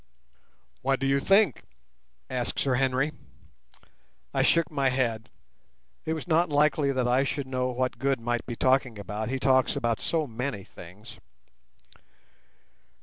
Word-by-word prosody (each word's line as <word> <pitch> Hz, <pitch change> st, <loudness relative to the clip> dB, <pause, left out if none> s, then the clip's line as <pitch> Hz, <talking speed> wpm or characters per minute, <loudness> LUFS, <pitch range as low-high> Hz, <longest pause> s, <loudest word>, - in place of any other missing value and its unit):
"What 135 Hz, 0 st, +1 dB
do 135 Hz, -, -2 dB
you 135 Hz, 0 st, +3 dB
think?" 195 Hz, -, +3 dB, 0.7 s
asked 125 Hz, -2 st, -3 dB
Sir 135 Hz, -, +1 dB
Henry. 135 Hz, +3 st, +1 dB, 1.2 s
I -, -, +2 dB
shook 165 Hz, 0 st, +3 dB
my 140 Hz, -3 st, +1 dB
head. 120 Hz, -4 st, -1 dB, 0.8 s
It 160 Hz, -, -1 dB
was 160 Hz, +2 st, -6 dB
not 170 Hz, +1 st, +3 dB
likely 145 Hz, -1 st, +2 dB
that 130 Hz, -2 st, 0 dB
I 125 Hz, +2 st, +3 dB
should 140 Hz, 0 st, -3 dB
know 130 Hz, -1 st, -1 dB
what 125 Hz, 0 st, -2 dB
Good 135 Hz, -1 st, +1 dB
might 120 Hz, 0 st, -2 dB
be 120 Hz, -, -4 dB
talking 130 Hz, -2 st, +2 dB
about. 105 Hz, +2 st, -4 dB
He 135 Hz, -, -1 dB
talks 130 Hz, 0 st, +3 dB
about 115 Hz, -1 st, -1 dB
so 160 Hz, -2 st, 0 dB
many 120 Hz, -4 st, -4 dB
things. 95 Hz, +6 st, -13 dB
130 Hz, 145 wpm, -27 LUFS, 120-140 Hz, 1.2 s, you